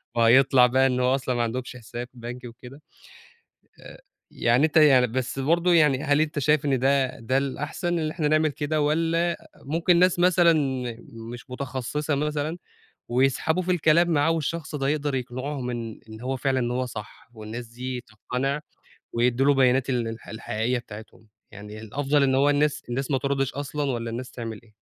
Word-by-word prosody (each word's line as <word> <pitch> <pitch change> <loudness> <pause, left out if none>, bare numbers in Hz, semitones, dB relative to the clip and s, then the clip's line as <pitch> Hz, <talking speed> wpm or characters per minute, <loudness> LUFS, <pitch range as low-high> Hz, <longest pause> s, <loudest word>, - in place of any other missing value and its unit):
وهيطلع 125 +2 +5
بقى 130 +2 +3
إن 125 -1 0
هو 125 +1 +3
أصلًا 130 -2 -2
ما 120 - +1
عندهمش 125 +2 -4
حساب 120 +1 -7
بنكي 120 +1 -8
وكده. 125 +5 -13 1.0
آآ - - -13 0.3
يعني 120 +5 +2
أنت 160 0 +1
يعني 135 -5 +6
بس 130 +3 -3
برضه 170 +5 +2
يعني 150 -4 +4
هل 145 0 +3
أنت 155 -1 -1
شايف 150 +1 +2
إن 135 -3 +1
ده 135 0 +1
ده 130 +4 0
الأحسن 150 +5 -2
اللي 155 -1 -1
إحنا 155 -4 0
نعمل 155 0 +3
كده 150 +2 -2
والّا 165 +3 +1
أ - - -3 0.3
ممكن 170 +4 +2
ناس 180 -1 +3
مثلًا 175 -1 +5 0.8
مش 120 +1 -10
متخصصة 140 +3 -3
مثلًا، 150 +2 -2 0.5
ويسحبه 135 +8 +1
في 185 - -3
الكلام 170 0 +3
معاه، 155 +1 +3
والشخص 160 0 -2
ده 135 -1 -1
يقدر 145 -1 -1
يقنعهم 130 +1 -4
إن 115 -2 -6
إن 110 0 -10
هو 130 +2 -2
فعلًا 130 +1 0
إن 120 0 -1
هو 125 +1 -1
صح، 105 -3 -10
والناس 110 +2 -7
دي 125 +2 -5
تقتنع 130 +6 -3 0.5
ويدّوا 125 +3 +2
له 145 - +5
بيانات 130 0 +3
ال 120 -3 0
الح 115 0 -9
الحقيقية 110 +3 -2
بتاعتهم، 110 -1 -12 0.2
يعني 105 +2 -10
الأفضل 140 +6 0
إن 130 -1 +3
هو 140 +2 +4
الناس 145 0 +1
الناس 130 +3 -3
ما 135 - +2
تردش 135 -1 -1
أصلًا 145 +1 -4
والّا 115 -2 -3
الناس 125 +2 -6
تعمل 115 -3 -7
إيه؟ 110 -2 -24
135 Hz, 180 wpm, -25 LUFS, 120-150 Hz, 1.0 s, يعني